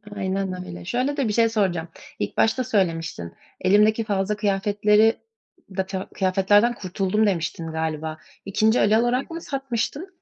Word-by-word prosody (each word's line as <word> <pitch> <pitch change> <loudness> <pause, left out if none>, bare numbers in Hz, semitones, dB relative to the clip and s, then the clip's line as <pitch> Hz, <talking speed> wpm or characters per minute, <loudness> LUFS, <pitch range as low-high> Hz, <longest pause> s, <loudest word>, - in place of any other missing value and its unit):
Aynen 190 -1 -3
öyle. 175 -1 -9
Şöyle 255 - -1
de 270 -5 +1
bir 210 - -1
şey 230 0 +3
soracağım, 185 -6 0 0.3
ilk 105 - -3
başta 255 +3 +2
söylemiştin, 165 - -1 0.3
"Elimdeki 210 +4 +4
fazla 200 0 -1
kıyafetleri 210 +2 +2 0.6
da 190 - +1
ta 190 0 -5
kıyafetlerden 200 +5 +3
kurtuldum." 195 +1 0
demiştin 165 -3 -2
galiba. 160 0 -3 0.3
2'nci 215 +4 +2
el 215 +2 +4
olarak 250 +6 0
mı 330 0 -5
satmıştın? 275 - -3
205 Hz, 140 wpm, -23 LUFS, 185-225 Hz, 0.6 s, Elimdeki